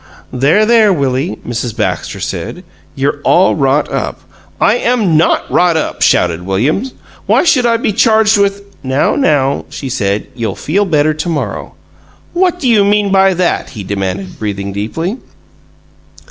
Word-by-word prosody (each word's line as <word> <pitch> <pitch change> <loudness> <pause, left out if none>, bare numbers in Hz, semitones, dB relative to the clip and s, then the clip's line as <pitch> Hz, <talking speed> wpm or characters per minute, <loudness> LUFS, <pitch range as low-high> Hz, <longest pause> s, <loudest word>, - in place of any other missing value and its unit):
"There, 145 +12 +3
there, 225 -2 +4
Willie," 140 -1 -1
Mrs. 120 -1 -4
Baxter 105 - -2
said. - - -5 0.3
"You're - - -1
all - - +3
wrought - - +1
up - - -3 0.2
" - - -31
"I 220 - +2
am 230 -10 +1
NOT 160 +2 +2
wrought 175 -2 +3
up!" 160 - -3
shouted 85 -1 +2
William. 115 - -1 0.4
"Why - - +3
should 255 -8 +3
I 230 -1 +2
be 220 -2 -1
charged 220 0 +3
with 200 0 0
" - - -31
"Now, 130 +1 +1
now!" 140 - +1
she 135 - -6
said. 105 -5 -1
"You'll 115 -3 -3
feel 200 +7 0
better 155 -3 +2
to 155 +3 -4
morrow." 160 -3 -4 0.6
"What 360 0 +1
do 275 - -1
you 220 -4 +4
mean 205 0 +1
by 195 -1 +4
that?" 180 0 -1
he 100 - -5
demanded, 95 -1 -4
breathing 100 -2 -4
deeply. 165 - -3
160 Hz, 160 wpm, -13 LUFS, -, 0.6 s, there